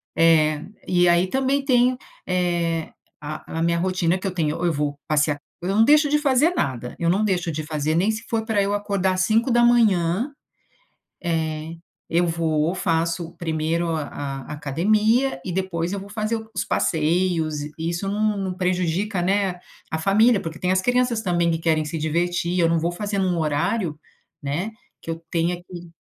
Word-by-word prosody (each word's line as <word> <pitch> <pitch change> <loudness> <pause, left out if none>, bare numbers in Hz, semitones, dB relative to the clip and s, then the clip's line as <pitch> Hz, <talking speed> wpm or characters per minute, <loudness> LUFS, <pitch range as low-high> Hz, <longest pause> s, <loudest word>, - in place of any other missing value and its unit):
é. 155 -2 +4 0.2
E 175 -1 +4
aí 175 +2 +3
também 270 +4 0
tenho, 250 -1 +3 0.3
eh, 175 -3 0 0.3
a 155 +2 -6
a - - 0
minha 170 0 +2
rotina 180 -1 +1
que 185 - -8
eu 190 - -1
tenho, 155 -4 0
ou 175 - -2
eu 170 - +3
vou 145 0 -2
passear 150 -1 +1 0.3
eu - - -1
não 220 +2 +5
deixo 295 +2 +5
de 300 - +3
fazer 285 +1 +3
nada. 125 - -2
Eu 170 0 +1
não 200 +4 +2
deixo 180 -4 0
de 155 -1 -3
fazer, 155 0 -1
nem 190 +6 +2
se 220 +1 -5
for 225 -1 0
pra 220 -3 +1
eu 200 +1 0
acordar 200 -2 0
às 185 - 0
5h, 230 - +3 0.9
eh, 160 -1 -2 0.3
eu 175 +1 +2
vou, 165 0 0
faço 165 -1 -1
1º 165 +1 -1
a 155 - -2 0.4
a - - -9
academia 215 - +1
e 185 - -4
depois 180 -2 -2
eu 200 - -2
vou 200 +1 -10
fazer 215 +2 -2
o 220 -1 -6
os - - 0
passeios 160 -1 0
e 150 - -7
isso 170 +4 -2
não 210 +1 0
não 190 -1 -2
prejudica, 180 +1 -1
né, 190 -1 0 0.3
a 160 - -2
família, 205 +7 +4
porque 165 -2 -7
tem 180 - 0
as 190 0 +2
crianças 245 -2 +1
também 175 -2 +1
que 165 - +1
querem 160 -1 +1
se 150 +2 -4
divertir 170 +3 0
eu 165 - +4
não 165 - +2
vou 170 +2 -1
fazer 205 +3 -3
num 185 -3 +1
horário, 155 +2 -1 0.4
né, 155 +9 -2 0.3
que - - -10
eu 165 - -3
tenha 170 +1 0
que 175 -2 -10
175 Hz, 185 wpm, -23 LUFS, 165-205 Hz, 0.9 s, não